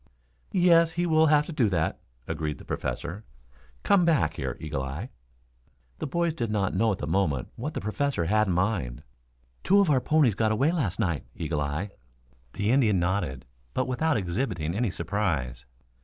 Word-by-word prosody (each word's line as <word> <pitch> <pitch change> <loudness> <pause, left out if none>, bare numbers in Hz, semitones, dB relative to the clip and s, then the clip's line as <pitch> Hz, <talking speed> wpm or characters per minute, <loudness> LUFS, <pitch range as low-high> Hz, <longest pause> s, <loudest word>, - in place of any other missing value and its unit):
"Yes, 170 -3 +4
he 175 +1 0
will 160 -1 +4
have 150 0 +4
to - - -7
do 130 -9 +2
that," 80 -4 -1 0.3
agreed 75 -1 -3
the - - -13
Professor. 95 +7 -4 0.6
"Come 200 -3 +4
back 150 - +2
here, 65 -5 -4
Eagle 75 -3 -3
eye." 70 - -5 0.9
The - - -3
boys 170 +3 0
did 120 -8 -3
not 100 -3 0
know 115 -1 +2
at 95 - -2
the - - -4
moment 80 -6 0
what - - -5
the - - -2
Professor 110 -1 -1
had 110 +4 +2
in 95 - +1
mind. 85 - -1 0.6
"Two 200 +2 +5
of 195 -6 +4
our 130 -3 +3
ponies 150 -6 +3
got 110 +2 +1
away 135 +9 +2
last 135 - -1
night, 85 - -1
Eagle 75 -3 -2
eye." 75 +8 -3 0.6
The 105 +2 0
Indian 120 -7 +4
nodded, 85 -7 -1 0.3
but 130 - +1
without 145 +5 +1
exhibiting 90 - -2
any 115 +3 0
surprise. 75 - -2
105 Hz, 175 wpm, -27 LUFS, -, 0.9 s, Two